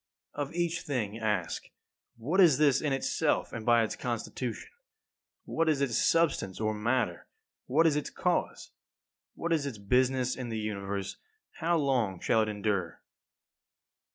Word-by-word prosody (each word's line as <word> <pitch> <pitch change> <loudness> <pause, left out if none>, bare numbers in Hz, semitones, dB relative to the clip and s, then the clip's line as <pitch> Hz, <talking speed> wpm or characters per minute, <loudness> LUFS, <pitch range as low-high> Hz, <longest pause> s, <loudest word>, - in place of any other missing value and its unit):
11. 145 0 -3
Of 170 - -8
each 170 -1 0
thing 115 -6 -3
ask: 105 -6 -2 0.5
What 155 +12 +2
is 160 -8 +6
this 145 -3 +4
in 150 - 0
itself 135 0 0
and 115 - -5
by 120 -1 +5
its 110 - -3
constitution? 120 0 -4 0.7
What 165 0 0
is 150 -3 +2
its 135 -5 0
substance 165 - +2
or 110 0 0
matter? 110 -4 -1 0.4
What 155 +6 +3
is 155 -3 +4
its 150 - -2
cause? - - -1 0.6
What 170 0 -1
is 150 -3 0
its 125 -6 -5
business 125 +4 +1
in 125 -2 -5
the 115 - -3
Universe? 100 -2 -4 0.4
How 170 +1 +1
long 125 - +1
shall 110 - +2
it 110 - 0
endure? 100 -5 -2
125 Hz, 155 wpm, -30 LUFS, 110-145 Hz, 0.7 s, is